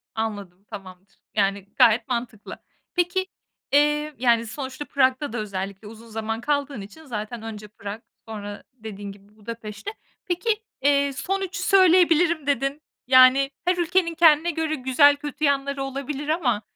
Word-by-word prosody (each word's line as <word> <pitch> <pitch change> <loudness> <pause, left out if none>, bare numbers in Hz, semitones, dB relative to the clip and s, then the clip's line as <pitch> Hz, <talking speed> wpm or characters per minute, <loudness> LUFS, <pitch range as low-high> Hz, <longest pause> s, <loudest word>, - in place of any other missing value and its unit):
Anladım, 200 -4 -4
tamamdır. 190 -1 -12 0.2
Yani 200 -1 +1
gayet 240 0 +4
mantıklı. 235 -4 -5 0.3
Peki, 355 +2 +1 0.5
iii, 295 +1 +2
yani 235 -2 +3
sonuçta 270 +4 -6
Prag'da 260 -1 +1
da - - -3
özellikle 200 -1 -5
uzun 225 +2 -12
zaman 225 0 -4
kaldığın 285 -4 -1
için 260 +11 -12
zaten 225 -2 -5
önce 215 -2 -8
Prag, 205 +1 -8 0.3
sonra 205 -2 -7
dediğin 210 -4 -8
gibi 200 +1 -18
Budapeşte. 220 - -7 0.3
Peki, 420 +4 -1 0.2
iii, 280 0 +3
"son 390 +8 -2
3'ü 380 0 -4
söyleyebilirim" 345 -4 +4
dedin, 280 +2 0 0.3
yani 260 +1 +6
her 360 0 +2
ülkenin 345 0 +1
kendine 325 0 +5
göre 320 -1 -1
güzel 280 +2 +5
kötü 290 +1 -7
yanları 280 0 0
olabilir 275 +2 -5
ama, 265 -10 +1
260 Hz, 140 wpm, -24 LUFS, 215-300 Hz, 0.5 s, yani